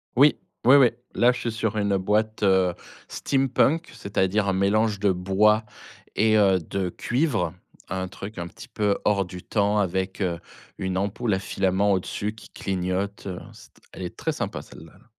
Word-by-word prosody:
Oui, 145 +4 +6 0.3
oui, 130 - +8
oui. 130 -4 +7 0.3
Là, 120 +1 +5
je 125 - -5
suis 115 - -2
sur 110 -1 -2
une 100 -2 +1
boîte, 105 +3 0
heu, 95 -2 +4 0.3
steampunk, 135 +4 +1
c'est-à-dire 100 -2 0
un 95 - +2
mélange 100 +2 +2
de 100 -1 +3
bois 100 +4 +3 0.5
et, 110 +1 +4
heu, 95 -3 +4
de 90 +3 -3
cuivre. 115 - 0 0.4
Un 95 0 -2
truc, 100 +2 -9
un 85 - -4
petit 115 - -12
peu, 105 -4 0
hors 100 -2 +2
du 90 0 -9
temps 105 0 +1
avec, 95 +1 -1
heu, 85 -3 -1 0.4
une 95 -1 -2
ampoule 105 +3 -1
à 95 - +1
filament 95 +1 +1
au-dessus 100 +3 -2
qui 110 - -14
clignote, 95 +1 -3
heu 90 -2 -4
C’est - - -16
t - - -25
elle 95 - -7
est 90 - -6
très - - -2
sympa, - - -4
celle-là, - - -14
là. - - -22
100 Hz, 180 wpm, -25 LUFS, 95-110 Hz, 0.5 s, oui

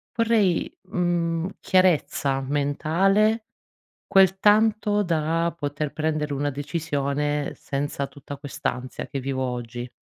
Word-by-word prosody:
vorrei, 225 -6 +2 0.2
mhmm, 175 -1 0
chiarezza 165 -7 +2
mentale, 170 - +1 0.6
quel 190 0 +5
tanto 210 0 +3
da 165 -1 0
poter 145 -1 -3
prendere 155 -1 -1
una 145 +1 -1
decisione 145 -1 -2
senza 140 0 -3
tutta 145 0 -10
quest'ansia 135 -3 -4
che 140 - -4
vivo 130 0 -2
oggi. 120 -1 -4
155 Hz, 100 wpm, -24 LUFS, 140-185 Hz, 0.6 s, quel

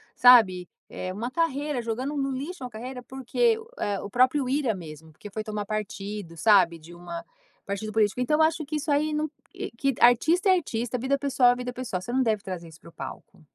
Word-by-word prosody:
sabe, 215 -8 +6 0.2
é 185 0 -5
uma 230 +6 -4
carreira, 295 -3 -1
jogando 250 +6 -3
no 275 -1 0
lixo, 280 +5 -5
uma 250 - -5
carreira, 250 +3 -7
porque 265 - +1 0.2
é 200 -2 -1
o 200 - -6
próprio 255 +3 +3
Ira 265 -5 +1
mesmo 160 -3 -10
porque 205 +7 -11
foi 215 +2 -4
tomar 210 -1 -4
partido, 205 -3 -5
sabe, 195 -6 +5
de 165 +2 -14
uma 170 -1 -7 0.4
partido 200 +2 -4
político. 215 +1 +2
Então 300 +5 +2
eu - - +6
acho 320 -1 -4
que 305 +2 -4
isso 300 0 -2 0.2
não 305 +1 0 0.5
que 275 -3 +1
artista 320 - +5
é 375 - +7
artista, 240 -5 -3
vida 270 +3 +1
pessoal 275 -3 +3
é - - -5
vida 250 0 -5
pessoal. 240 -8 -4
Você 240 - -6
não 265 - +3
deve 215 -3 0
trazer 180 -4 -6
isso 160 -1 -15
para - - -14
o - - -20
palco. 135 -5 -9
240 Hz, 210 wpm, -26 LUFS, 200-275 Hz, 0.5 s, é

